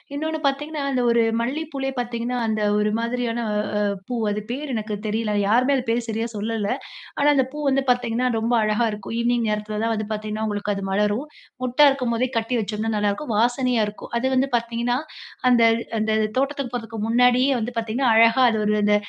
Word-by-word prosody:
இன்னோண்ணு 315 Hz, +1 st, -2 dB
பாத்தீங்கன்னா, 295 Hz, +2 st, -2 dB
அந்த 255 Hz, -2 st, +1 dB
ஒரு 235 Hz, 0 st, +4 dB, 0.2 s
மல்லிப்பூலயே 270 Hz, +1 st, -3 dB
பாத்தீங்கன்னா, 240 Hz, +1 st, -2 dB
அந்த 215 Hz, -1 st, -1 dB, 0.2 s
ஒரு 210 Hz, 0 st, +1 dB
மாதிரியான 235 Hz, 0 st, -2 dB, 0.4 s
அ -, -, +1 dB, 0.3 s
பூ 245 Hz, -, -2 dB
அது 210 Hz, 0 st, -3 dB
பேர் 280 Hz, +2 st, -4 dB
எனக்கு 215 Hz, -1 st, -3 dB
தெரியல! 215 Hz, 0 st, -1 dB
யாருமே 250 Hz, +6 st, +3 dB
அது 255 Hz, -, -3 dB
பேர் 235 Hz, 0 st, 0 dB
சரியா 225 Hz, +1 st, -1 dB
சொல்லல. 215 Hz, -1 st, -2 dB, 0.5 s
ஆனா, 285 Hz, -, +3 dB
அந்த 265 Hz, -2 st, +3 dB
பூ 300 Hz, -, -6 dB
வந்து 270 Hz, 0 st, +1 dB
பாத்தீங்கன்னா, 245 Hz, 0 st, 0 dB
ரொம்ப 230 Hz, +2 st, 0 dB
அழகா 215 Hz, +2 st, +1 dB
இருக்கும். 210 Hz, +2 st, -6 dB
ஈவினிங் 240 Hz, -1 st, +1 dB
நேரத்தில 210 Hz, 0 st, -2 dB
தான் 230 Hz, 0 st, +1 dB
வந்து 215 Hz, -1 st, -3 dB
பாதீங்கன்னா 215 Hz, +1 st, -3 dB
உங்களுக்கு 205 Hz, 0 st, -2 dB
அது 195 Hz, -, -4 dB
மலரும். 210 Hz, +8 st, 0 dB, 0.4 s
மொட்டா 255 Hz, +4 st, +3 dB
இருக்கும் 255 Hz, -4 st, -1 dB
போதே 255 Hz, +2 st, +1 dB
கட்டிவெச்சோம்ன்னா 225 Hz, -1 st, -1 dB
நல்லா 205 Hz, 0 st, +1 dB
இருக்கும். 230 Hz, +3 st, -4 dB
வாசனையா 245 Hz, 0 st, +2 dB
இருக்கும். 210 Hz, -, -9 dB
அது 260 Hz, -, 0 dB
வந்து 265 Hz, +2 st, +2 dB
பாத்தீங்கன்னா, 235 Hz, +1 st, -1 dB, 0.5 s
அந்த 240 Hz, -1 st, +4 dB, 0.4 s
அந்த 220 Hz, 0 st, 0 dB, 0.3 s
தோட்டத்துக்கு 275 Hz, -2 st, -1 dB
போறதுக்கு 225 Hz, -2 st, -6 dB
முன்னாடியே 250 Hz, +3 st, +4 dB
வந்து 230 Hz, +2 st, -3 dB
பாத்தீங்கன்னா, 230 Hz, +3 st, 0 dB
அழகா 230 Hz, +3 st, +5 dB
அது 220 Hz, -, 0 dB
ஒரு 210 Hz, -, +2 dB
அந்த 210 Hz, 0 st, +4 dB
235 Hz, 180 wpm, -23 LUFS, 215-255 Hz, 0.5 s, அழகா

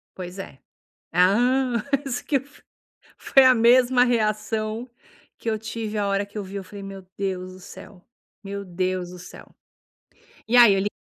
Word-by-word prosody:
Pois 185 Hz, +1 st, -8 dB
é. 135 Hz, -8 st, -9 dB, 0.5 s
Hã, 235 Hz, +6 st, +2 dB, 0.2 s
isso 245 Hz, -2 st, -3 dB
que 290 Hz, -, +1 dB
f 275 Hz, +2 st, -7 dB, 0.5 s
foi 270 Hz, -1 st, +4 dB
a 255 Hz, 0 st, +7 dB
mesma 245 Hz, +2 st, +5 dB
reação 220 Hz, 0 st, -1 dB, 0.5 s
que 230 Hz, -, -6 dB
eu 220 Hz, -, 0 dB
tive 220 Hz, 0 st, -5 dB
a 200 Hz, -, 0 dB
hora 200 Hz, 0 st, 0 dB
que 200 Hz, -, -17 dB
eu 205 Hz, -, -3 dB
vi, 195 Hz, +1 st, -8 dB
eu 195 Hz, -, -5 dB
falei: 200 Hz, +1 st, -10 dB
"Meu 195 Hz, -1 st, -9 dB
Deus 185 Hz, -2 st, -3 dB
do 185 Hz, -, -13 dB
céu. 190 Hz, 0 st, -13 dB, 0.4 s
Meu 200 Hz, 0 st, -6 dB
Deus 185 Hz, 0 st, -3 dB
do 180 Hz, -, -10 dB
céu". 180 Hz, -, -13 dB, 0.9 s
E 245 Hz, -, +3 dB
aí 235 Hz, -4 st, +8 dB
eu 195 Hz, -, +1 dB
li 200 Hz, -, 0 dB
210 Hz, 175 wpm, -24 LUFS, 190-240 Hz, 0.9 s, aí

